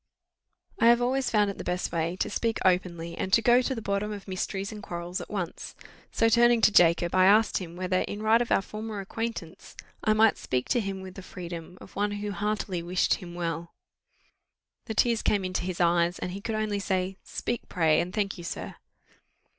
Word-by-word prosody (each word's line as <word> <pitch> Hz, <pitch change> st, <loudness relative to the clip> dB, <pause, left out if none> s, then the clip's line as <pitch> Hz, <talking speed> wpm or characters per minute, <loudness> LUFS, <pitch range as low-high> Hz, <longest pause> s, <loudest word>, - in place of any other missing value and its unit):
I 230 Hz, -, +5 dB
have 235 Hz, 0 st, +6 dB
always 255 Hz, +2 st, +1 dB
found 210 Hz, -2 st, +2 dB
it -, -, -12 dB
the -, -, -4 dB
best 180 Hz, 0 st, -2 dB
way 165 Hz, +1 st, -1 dB
to -, -, -2 dB
speak 230 Hz, -1 st, 0 dB
openly, 170 Hz, -2 st, +1 dB
and 190 Hz, -, -3 dB
to -, -, +7 dB
go 245 Hz, +2 st, +6 dB
to 265 Hz, +1 st, -2 dB
the 225 Hz, -, -6 dB
bottom 200 Hz, +1 st, -1 dB
of 205 Hz, -1 st, -7 dB
mysteries 195 Hz, +1 st, -3 dB
and 210 Hz, -1 st, -8 dB
quarrels 175 Hz, -1 st, -5 dB
at -, -, -9 dB
once: 185 Hz, -5 st, -5 dB, 0.4 s
so 225 Hz, -, +2 dB
turning 240 Hz, +1 st, +5 dB
to 215 Hz, -, +6 dB
Jacob, 170 Hz, -2 st, +4 dB
I 185 Hz, 0 st, +5 dB
asked 215 Hz, +3 st, +4 dB
him, 170 Hz, -3 st, -8 dB
whether, 185 Hz, 0 st, 0 dB
in 205 Hz, +1 st, -4 dB
right 225 Hz, +2 st, +4 dB
of 240 Hz, -, -3 dB
our 195 Hz, -, +3 dB
former 215 Hz, 0 st, -6 dB
acquaintance, 200 Hz, -3 st, -6 dB, 0.3 s
I 215 Hz, -, +3 dB
might 220 Hz, 0 st, +4 dB
speak 125 Hz, -1 st, -2 dB
to 245 Hz, -, +3 dB
him 195 Hz, -3 st, -4 dB
with 190 Hz, -1 st, -9 dB
the 195 Hz, -, -9 dB
freedom 175 Hz, -1 st, -8 dB
of -, -, -14 dB
one 205 Hz, 0 st, 0 dB
who 205 Hz, 0 st, -4 dB
heartily 205 Hz, -3 st, -2 dB
wished 180 Hz, +2 st, +1 dB
him 175 Hz, -2 st, -6 dB
well? 170 Hz, -1 st, -4 dB, 1.1 s
The 220 Hz, -, -4 dB
tears 230 Hz, 0 st, +3 dB
came 200 Hz, -3 st, +1 dB
into 185 Hz, 0 st, -2 dB
his 185 Hz, -2 st, -4 dB
eyes, 175 Hz, 0 st, +2 dB
and 180 Hz, -, -4 dB
he 195 Hz, +2 st, -6 dB
could 220 Hz, +1 st, -3 dB
only 215 Hz, -1 st, -1 dB
say, 190 Hz, -1 st, -1 dB
"Speak, 240 Hz, -, -4 dB
pray 160 Hz, -4 st, +3 dB
and 180 Hz, -, -4 dB
thank 200 Hz, -2 st, -2 dB
you, -, -, -8 dB
sir." 170 Hz, -, -6 dB
195 Hz, 210 wpm, -27 LUFS, 175-215 Hz, 1.1 s, to